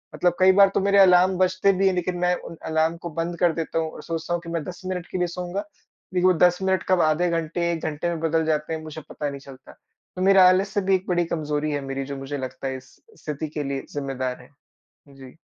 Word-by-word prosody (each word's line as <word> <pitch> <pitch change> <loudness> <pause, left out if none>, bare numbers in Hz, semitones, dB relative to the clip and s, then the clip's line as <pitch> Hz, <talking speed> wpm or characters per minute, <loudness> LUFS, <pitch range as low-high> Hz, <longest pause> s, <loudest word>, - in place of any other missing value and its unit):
मतलब 175 -1 +2
कई 185 0 +7
बार 195 +1 +6
तो - - +4
मेरे 200 +1 +3
अलार्म 185 0 +5
बजते 185 +1 +3
भी 195 +1 +3
हैं 190 - +3
लेकिन 180 0 -2
मैं 180 0 +2 0.2
उन 165 - -10
अलार्म 160 +1 +1
को - - -2
बंद 170 +1 -2
कर 175 -2 +3
देता 165 0 -2
हूँ 160 -1 -2
और - - -10
सोचता 165 0 -4
हूँ 175 - -1
कि 170 - -9
मैं 165 -2 -2
10 175 +1 -8
मिनट 180 -2 -4
के - - -2
लिए 180 -1 +1
सोऊँगा 180 +3 -4 0.5
लेकिन 180 0 +3
वो - - +3
10 180 0 -2
मिनट 190 -1 +1
कब 185 -2 +4
आधे 155 +3 +2
घंटे, 170 +1 -1
1 165 -2 -3
घंटे 155 +2 -2
में 170 -1 -3
बदल 160 0 +1
जाते 155 0 -1
हैं 160 - -4
मुझे 155 0 -8
पता 150 - -4
नहीं 140 0 -7
चलता। 135 -1 -14
तो 185 - -14
मेरा 190 -1 +7
आलस्य 195 +2 +1
भी 190 0 +2
एक 190 0 -3
बड़ी 175 -1 +1
कमजोरी 155 -2 -2
है 145 -1 -2
मेरी 135 0 -3
जो 140 - -4
मुझे 135 +1 -5
लगता 130 0 -5
है 130 0 -3
इस 130 0 -16 0.3
स्थिति 150 +1 -4
के 150 - -1
लिए 135 -1 -4
ज़िम्मेदार 130 -3 -3
है। 125 - -17 0.7
जी। 135 +1 -13
170 Hz, 250 wpm, -24 LUFS, 150-180 Hz, 0.7 s, कई